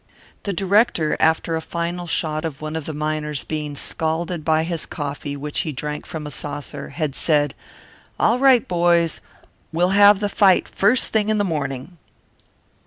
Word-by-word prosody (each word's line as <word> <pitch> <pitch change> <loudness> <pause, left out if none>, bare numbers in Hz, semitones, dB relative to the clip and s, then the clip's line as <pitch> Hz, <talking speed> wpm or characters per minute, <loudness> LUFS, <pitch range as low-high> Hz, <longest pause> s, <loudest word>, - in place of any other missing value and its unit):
The 200 - 0
director, 195 -4 +2
after 160 +1 +2
a 160 - -2
final 170 +1 -4
shot 155 -1 -1
of 155 -3 -4
one 155 +1 -5
of 160 -2 -4
the - - -4
miners 150 -1 -3
being 150 -2 -4
scalded 160 +3 -2
by 160 0 +2
his 165 -1 -2
coffee 145 -1 -5
which 145 +1 -4
he 155 - -1
drank 150 +2 -5
from 155 -2 -6
a 150 - -6
saucer, 145 0 -6
had 150 -1 -2
said, 145 -1 +1 0.7
"All 235 +3 +3
right, 265 -3 +5
boys! 170 -2 +2 0.5
We'll 175 +3 +2
have 205 0 +7
the 205 - 0
fight 195 -2 +4
first 215 +6 +2
thing 215 -1 +1
in 215 - +2
the 205 - +2
morning." 150 -1 -4
160 Hz, 170 wpm, -21 LUFS, 150-180 Hz, 0.7 s, have